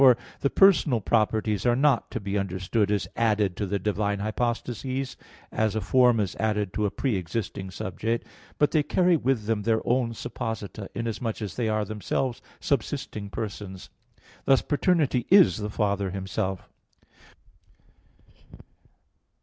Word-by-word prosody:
For 130 -3 +8 0.2
the 140 - +1
personal 160 - +5
properties 110 -1 +1
are 120 -1 +3
not 135 -2 +2
to - - -4
be 100 -1 -4
understood 100 +2 0
as 105 -2 0
added 105 -5 +1
to 105 - -2
the 100 +2 0
divine 100 +1 -1
hypostases, 120 +4 -2 0.4
as 110 -1 0
a - - +1
form 125 0 +4
is 100 -4 -1
added 105 -2 0
to 105 +1 +1
a - - -1
pre 120 0 -1
existing 95 +1 -4
subject: 110 +5 -3 0.3
but 150 - +3
they 155 - +3
carry 180 +4 +3
with 130 -7 0
them 110 -1 0
their 110 +1 +2
own 120 -1 +1
supposita, 110 -2 -5
inasmuch 115 0 -3
as 100 - -5
they 115 -3 0
are 110 -1 0
themselves 110 +4 -2 0.2
subsisting 100 -1 -2
persons; 100 -3 -6 0.5
thus 135 - +4
paternity 145 -5 +1
is 190 -1 +7
the 105 -1 -3
Father 100 -2 0
Himself. 95 0 -3
110 Hz, 140 wpm, -26 LUFS, 100-125 Hz, 0.5 s, For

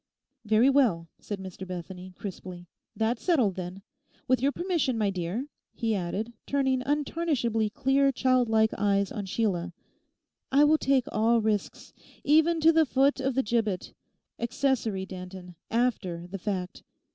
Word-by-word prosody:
'Very 220 +3 +4
well,' 240 -12 +3
said 205 - -5
Mr 190 0 -8
Bethany 180 +1 -7
crisply, 180 -3 -8 0.3
'that's 225 +1 0
settled, 260 - +2
then. 185 +1 -7 0.4
With 255 -1 +2
your 275 +2 +2
permission, 330 -8 -1
my 210 -2 +1
dear,' 185 +7 -3 0.3
he 225 -2 0
added, 200 +5 -3
turning 265 -2 +1
untarnishably 275 -6 0
clear 270 +5 +2
childlike 240 -4 +2
eyes 200 -1 +1
on 205 -3 -5
Sheila, 180 -4 -1 0.8
'I 280 +2 +5
will 305 +1 +4
take 265 -2 +2
all 230 +2 +3
risks—even 300 - 0
to 325 +1 +7
the 320 -2 +4
foot 275 +2 +2
of 265 -1 -1
the 265 - +2
gibbet: 215 -5 -1 0.5
accessory, 235 -5 -1
Danton, 185 -1 -9 0.2
after 215 -8 -1
the 190 +2 -7
fact. 185 -1 -4
225 Hz, 135 wpm, -28 LUFS, 190-270 Hz, 0.8 s, to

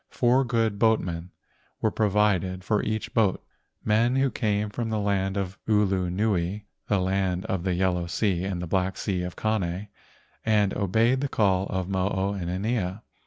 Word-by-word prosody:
Four 125 +2 +3
good 115 -4 0
boatmen 90 -7 +1 0.5
were 110 - +1
provided 100 -3 +1
for 105 +1 +1
each 110 0 -3
boat, 105 -5 +1 0.4
men 115 +4 +3
who 135 -1 +2
came 105 -2 -1
from 115 +1 -3
the 110 - -1
land 100 -1 0
of 95 -1 -3
Ulu 100 -4 +2
nui—the 100 +1 -1
land 95 -1 0
of 95 -2 -1
the 90 0 0
yellow 90 -1 0
sea 90 0 0
and 95 -2 -3
the - - -2
black 95 +2 0
sea 95 -4 -1
of 90 0 -5
Kane— 100 -2 -1 0.5
and 105 -3 +2
obeyed 115 +6 +2
the 140 - -1
call 95 -4 +2
of 95 -2 -2
Mo 95 0 0
o 95 +1 -1
inanea. 95 +2 -2
100 Hz, 165 wpm, -26 LUFS, 95-110 Hz, 0.5 s, Four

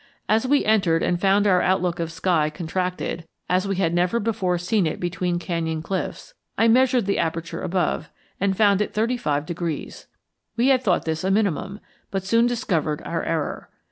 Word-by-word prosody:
As 220 +4 +2
we 285 +2 +3
entered 190 -7 +3
and 175 0 0
found 200 +1 +3
our 185 -3 +4
outlook 180 -2 +1
of 165 -1 -2
sky 165 -3 +1
contracted 175 0 -3 0.2
as 185 +2 +1
we 195 - -1
had 175 -3 0
never 180 +6 +1
before 200 -5 0
seen 180 +1 +1
it 155 - -3
between 175 0 -1
canyon 165 -2 -3
cliffs 195 - -4 0.2
I 225 - +4
measured 250 -1 +4
the 200 - 0
aperture 165 0 -2
above, 180 0 -1 0.3
and 195 -1 0
found 205 -2 +4
it 210 - -3
thirty 230 +4 +1
five 145 -10 -1
degrees. 170 -2 -5 0.5
We 245 +3 +3
had 260 -2 +4
thought 185 -8 +1
this 160 0 -2
a 190 - 0
minimum, 200 0 0 0.3
but 195 -1 -3
soon 230 +4 +3
discovered 165 -11 -1
our 165 - -2
error. 160 -3 -3
185 Hz, 180 wpm, -23 LUFS, 165-210 Hz, 0.5 s, our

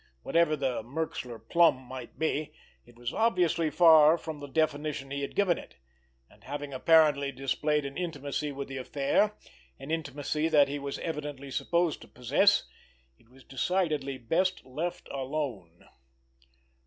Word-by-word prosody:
Whatever 170 -2 +2
the 135 -5 -1
"Merxler 125 -2 -4
plum" 170 -3 +5
might 130 -1 -10
be, 155 -1 -2 0.3
it 120 - -18
was 120 +1 -4
obviously 175 -7 +2
far 160 -1 +7
from 160 -2 -7
the 145 - -7
definition 145 -2 -1
he 140 0 -3
had 140 - -5
given 190 -4 +2
it, - - -13 0.5
and - - -23
having 145 0 -6
apparently 145 -1 +4
displayed 145 +3 -1
an 140 - -6
intimacy 145 -3 -3
with 140 0 -6
the 135 0 -6
affair, 140 +10 +1 0.4
an 135 +3 -8
intimacy 150 0 -2
that 145 -3 +5
he 145 +1 -4
was 140 0 -4
evidently 145 -4 -5
supposed 170 +3 0
to - - -12
possess, 140 - +3 0.6
it 115 - -26
was 130 +1 -18
decidedly 150 -2 -1
best 180 +9 0
left 155 +7 -4
alone! 130 - -5
145 Hz, 145 wpm, -29 LUFS, 135-160 Hz, 0.6 s, far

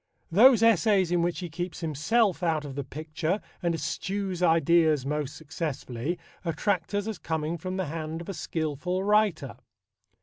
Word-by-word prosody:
Those 230 +5 +7
essays 205 -4 +4
in 175 -1 +2
which 175 +2 -1
he 175 - -5
keeps 175 +2 -5
himself 185 - +1
out 160 -3 0
of 140 - -6
the 140 +1 -3
picture 155 +6 -3 0.2
and 170 -2 +1
eschews 190 +2 -3
ideas 160 -3 +4
most 150 -1 -2
successfully 155 -2 -4 0.3
attract 180 +2 -1
us 205 0 0
as 220 -4 -4
coming 160 0 -2
from 185 +3 -5
the 190 - -1
hand 160 +1 -4
of 170 - -9
a 195 - -4
skilful 165 +2 -2
writer. 200 - +2
170 Hz, 160 wpm, -27 LUFS, 155-190 Hz, 0.3 s, Those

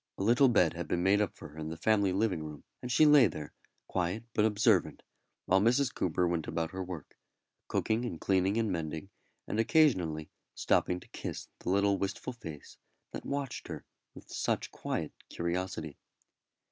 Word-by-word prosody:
A - - -2
little 120 +6 +5
bed 90 -8 +4
had 85 -1 -5
been 90 +2 0
made 100 +2 +4
up 105 - -1
for - - -10
her 75 +2 -11
in 80 0 -4
the 80 - -6
family 100 -2 +3
living 95 -3 +1
room, 75 -2 -8 0.2
and 125 - -4
she 155 +6 +6
lay 145 -5 +8
there, 75 -3 -7 0.3
quiet 90 +4 -1
but 105 - +3
observant, 105 - +2 0.4
while 95 +1 +4
Mrs. 125 +4 +3
Coomber 90 0 +1
went 85 -2 -1
about 80 0 -2
her 95 0 -4
work 90 -5 -8 0.5
cooking 110 +2 0
and 100 -10 -4
cleaning 95 +2 +2
and 110 -3 +1
mending, 80 +2 -4 0.4
and 110 - -2
occasionally 95 - +3 0.2
stopping 90 - +1
to - - -16
kiss - - -6
the - - -4
little 100 +1 +3
wistful 100 +6 -3
face 80 -11 -10 0.3
that - - -7
watched 140 -3 -3
her - - -7 0.3
with - - -13
such - - -1
quiet - - -3 0.2
curiosity. 85 -3 -3
95 Hz, 175 wpm, -31 LUFS, 85-110 Hz, 0.5 s, lay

